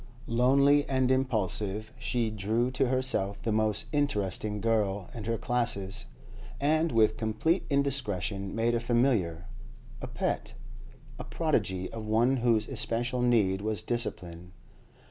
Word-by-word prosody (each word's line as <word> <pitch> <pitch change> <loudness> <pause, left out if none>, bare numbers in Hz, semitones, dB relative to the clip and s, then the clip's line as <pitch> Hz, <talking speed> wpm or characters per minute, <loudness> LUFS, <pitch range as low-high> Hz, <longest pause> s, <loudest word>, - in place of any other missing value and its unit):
Lonely 140 +4 +4
and 130 -1 +2
impulsive, 110 -4 -1
she 120 -2 -1
drew 110 +4 0
to 130 +1 +1
herself 125 -6 0
the 115 - -1
most 110 -1 +1
interesting 105 -8 -1
girl 105 -4 0
in 115 -4 -7
her 115 0 -1
classes, 115 -6 -1 0.5
and, 155 +3 +2
with 110 -1 +3
complete 115 - 0
indiscretion, 110 - -1
made 115 +1 +1
a 120 - +1
familiar, 115 -9 +1 0.6
a - - -5
pet, - - -3 0.6
a - - -4
prodigy 95 -1 -1
of 110 -1 -6
one 120 +5 +3
whose 115 -3 +2
especial 120 +2 -1
need 105 -6 +2
was 105 -3 -2
discipline. 90 -7 -4
115 Hz, 125 wpm, -29 LUFS, 105-125 Hz, 0.6 s, Lonely